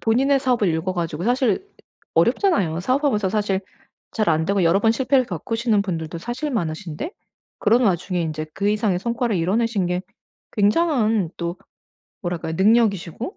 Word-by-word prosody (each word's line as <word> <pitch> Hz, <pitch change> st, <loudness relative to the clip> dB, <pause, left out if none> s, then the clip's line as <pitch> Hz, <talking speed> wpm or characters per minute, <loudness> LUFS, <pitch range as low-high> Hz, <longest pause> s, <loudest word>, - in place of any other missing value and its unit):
본인의 265 Hz, +5 st, +2 dB
사업을 245 Hz, -7 st, +2 dB
일궈 165 Hz, +3 st, -1 dB
가지고 170 Hz, -1 st, -3 dB
사실 250 Hz, -, +1 dB, 0.5 s
어렵잖아요. 185 Hz, -, +2 dB
사업하면서 255 Hz, -3 st, +1 dB
사실 200 Hz, -2 st, 0 dB, 0.5 s
잘 215 Hz, -5 st, 0 dB
안되고 170 Hz, +4 st, +1 dB
여러 180 Hz, +5 st, +4 dB
번 225 Hz, +1 st, +4 dB
실패를 260 Hz, +1 st, +2 dB
겪으시는 220 Hz, +4 st, 0 dB
분들도 170 Hz, -3 st, -4 dB
사실 245 Hz, -, -4 dB
많으신데 175 Hz, -, -3 dB, 0.5 s
그런 235 Hz, +4 st, +3 dB
와중에 180 Hz, -1 st, 0 dB
인제 155 Hz, -1 st, -3 dB
그 200 Hz, +1 st, 0 dB
이상의 210 Hz, -3 st, +1 dB
성과를 235 Hz, 0 st, -1 dB
이뤄내신 200 Hz, +3 st, +1 dB
게 180 Hz, +1 st, -1 dB, 0.5 s
굉장한 215 Hz, -, +2 dB
또 170 Hz, +1 st, -3 dB, 0.7 s
뭐랄까요 170 Hz, -2 st, -3 dB
능력이시고 215 Hz, -, +1 dB
205 Hz, 360 characters per minute, -22 LUFS, 175-235 Hz, 0.7 s, 여러